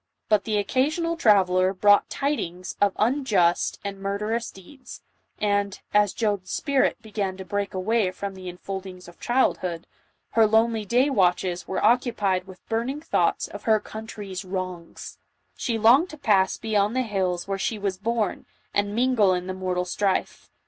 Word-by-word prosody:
But 210 -2 +3
the 215 -2 0
occasional 300 - 0
traveller 190 - +3
brought 205 +2 +4
tidings 185 - -3
of 200 -1 +4
unjust 215 -8 +2
and 200 -1 -5
murderous 210 +4 -2
deeds, 255 +9 -13 0.3
and, 205 -1 0
as 205 -1 +4
Joan's 205 -4 -2
spirit 280 -4 +1
began 200 -3 -3
to 190 - -8
break 200 0 -3
away 205 +2 +1
from 195 +2 -6
the 185 -1 -8
enfoklings 185 0 -7
of 175 - -15
childhood, 185 -9 0 0.5
her 225 -1 +5
lonely 220 0 +2
day 250 +7 +2
watches 180 -4 +1
were 190 - -1
occupied 210 -6 +2
with 185 -1 -14
burning 235 +6 -2
thoughts 320 - 0
of - - -10
her 220 -2 +4
country's 210 -3 -7
wrongs; 185 -2 -6 0.4
she 230 -2 -2
longed 245 +11 +5
to 310 - -10
pass 195 -8 +2
beyond 215 0 0
the 255 - +2
hills 185 -5 -2
where 195 0 -2
she 220 - -1
was 200 -2 -3
born, 225 -1 -2 0.3
and 205 0 0
mingle 230 -6 +3
in 180 0 -4
the 185 - -4
mortal 185 -1 -2
strife. 195 +1 -1
205 Hz, 155 wpm, -25 LUFS, 185-225 Hz, 0.5 s, her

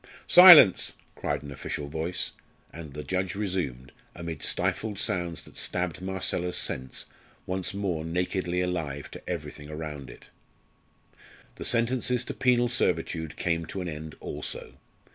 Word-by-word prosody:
"Silence!" 175 - +9 0.2
cried 75 -1 -3
an 70 - -8
official 70 +1 -5
voice, 80 +4 -2 0.4
and 80 -4 -9
the 75 - -5
judge 95 -1 -2
resumed, 85 -11 -3 0.2
amid 85 -3 -6
stifled 110 -2 -1
sounds 85 -4 -2
that - - -13
stabbed 90 -1 -2
Marcella's 95 -1 -1
sense, 65 0 -2 0.4
once 95 +1 -3
more 90 -6 -2
nakedly 90 +1 -1
alive 80 -6 -3
to - - -9
everything 75 0 -6
around 75 -4 -6
it. - - -14 1.3
The - - -5
sentences 125 +1 +2
to - - -4
penal 120 -1 +3
servitude 80 -9 -1
came 85 -2 -1
to 95 - -5
an 90 - -4
end 80 -1 -7
also. - - -5
85 Hz, 135 wpm, -27 LUFS, 75-95 Hz, 1.3 s, Silence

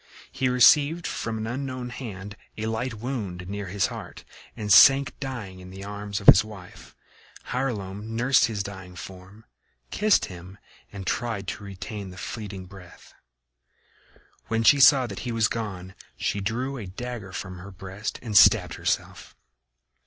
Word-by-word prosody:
He 130 -1 0
received 145 +6 +5
from 115 -1 -3
an 110 - -4
unknown 130 +1 -4
hand 105 -5 -7 0.2
a 110 - -3
light 110 +2 -2
wound 105 -7 -5
near 100 0 -5
his 100 +2 0
heart, - - -9 0.3
and 105 -2 +2
sank 135 +1 +7
dying 120 -9 -6
in 90 0 -11
the 95 +1 -9
arms 100 +1 -5
of 100 - -11
his 95 - +9
wife. 105 -4 -12 0.6
Hylonome 105 -6 -3
nursed 125 +3 +4
his 105 -3 -2
dying 95 -2 -9
form, 95 +4 -11 0.5
kissed 210 0 +3
him 90 0 -11 0.3
and 100 -2 -8
tried 110 -3 -2
to - - -6
retain 100 0 -7
the 90 - -12
fleeting 100 -1 -6
breath. 90 -1 -15 1.3
When 115 0 0
she 140 +5 +6
saw 135 -1 +7
that - - -7
he 120 - -4
was 115 -1 +2
gone 95 -5 -5 0.2
she 105 - -1
drew 125 +7 -2
a 105 -6 -7
dagger 110 0 -7
from 90 -1 -6
her 95 +3 -10
breast 95 +3 -6
and 110 -4 -5
stabbed - - +6
herself. - - -2
105 Hz, 155 wpm, -25 LUFS, 95-120 Hz, 1.3 s, his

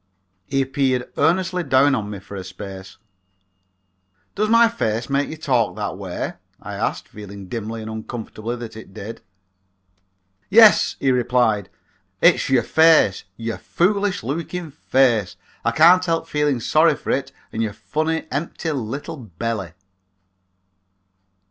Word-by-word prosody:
He 135 +2 +1
peered 130 -2 -1
earnestly 180 +2 +1
down 140 -1 +4
on 105 -5 -2
me 105 - -5
for 100 +1 -11
a 95 - -5
space. 95 +1 -9 1.4
"Does 215 +1 0
my 230 +1 +6
face 120 - -2
make 140 +1 +1
you 160 - -7
talk 125 -8 +1
that - - -3
way?" - - -5 0.3
I - - -8
asked, - - -2
feeling 100 -2 -10
dimly 115 +1 -5
and 110 - -6
uncomfortably 110 +1 -6
that 120 -2 -8
it 110 -3 -12
did. 110 +2 -8 1.3
"Yes," 220 +1 +6
he 135 - +2
replied, 120 -5 +1 0.5
"it's - - +4
your 130 -3 +3
face, 160 - +4
your 115 0 -4
foolish 200 - 0
looking 165 +5 -4
face. 125 - +1 0.3
I - - +2
can't 175 +4 +6
help 165 -2 -1
feeling 150 -3 0
sorry - - +4
for - - -4
it - - -1 0.2
and 110 - -2
your 110 -2 -1
funny 160 +6 -2
empty 160 +3 -3
little 140 +5 -4
belly." 105 - -5
125 Hz, 135 wpm, -21 LUFS, 110-160 Hz, 1.4 s, my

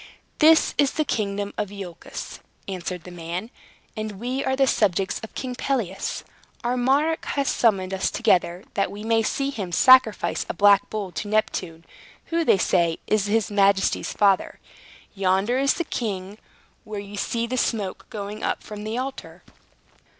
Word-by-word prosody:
"This 320 +1 +6
is 285 -2 +3
the 310 - 0
kingdom 205 -4 -2
of 205 - -1
Iolchos," 195 -4 -8 0.3
answered 180 -2 -5
the 180 - -10
man, 175 +6 -5 0.4
"and 215 -1 -4
we 245 +7 -3
are 265 - 0
the 270 0 +4
subjects 195 -6 +1
of 220 - -10
King 255 -1 -4
Pelias. 240 -7 -2 0.4
Our 240 +1 0
monarch 280 +6 +2
has 280 -1 -1
summoned 195 -5 +2
us 190 - 0
together, 175 0 +1
that 195 - 0
we 205 +1 -8
may 225 0 +2
see 275 +5 -1
him 200 -9 -5
sacrifice 220 -5 +5
a - - -3
black 200 +1 +5
bull 205 -4 -4
to 205 - -5
Neptune, 180 -6 -1 0.5
who, 335 0 +2
they 255 - +4
say, 170 -3 +2
is 210 -1 +1
his 215 -1 +1
majesty's 200 -1 +2
father. 200 -2 +2 0.5
Yonder 195 +5 +1
is 275 0 +3
the 340 - -1
king, 205 - -4 0.4
where 215 -1 -6
you 200 0 -8
see 230 +3 -1
the 245 +2 -3
smoke 210 -6 -2
going 210 0 -6
up - - -2
from 210 -1 -8
the 220 +2 -3
altar." 265 +1 -6
210 Hz, 165 wpm, -24 LUFS, 190-245 Hz, 0.5 s, This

